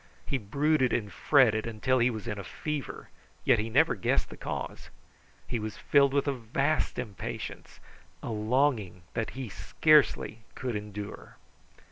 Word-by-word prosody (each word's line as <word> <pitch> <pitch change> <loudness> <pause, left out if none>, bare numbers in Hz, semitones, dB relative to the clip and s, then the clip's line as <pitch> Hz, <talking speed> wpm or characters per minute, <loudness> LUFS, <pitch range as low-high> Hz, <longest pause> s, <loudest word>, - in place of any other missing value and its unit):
He 135 - -1
brooded 140 +5 +1
and 105 -3 -1
fretted 115 -7 +4
until 125 +4 +1
he 120 +1 +4
was 110 -4 -5
in 105 - -3
a - - -5
fever; 150 +4 -5 0.4
yet - - +5
he 110 +2 -2
never - - +4
guessed - - 0
the - - -8
cause. - - -5 0.6
He 120 - -2
was 110 0 -5
filled 140 -1 +4
with 140 +1 +1
a 140 - +2
vast 135 +5 0
impatience, 110 -6 -6 0.4
a - - -3
longing 110 -4 +1
that 115 - -1
he 130 -2 -4
scarcely 115 - +3 0.2
could 125 -3 -3
endure. 105 -1 -7
120 Hz, 150 wpm, -29 LUFS, 105-140 Hz, 0.6 s, yet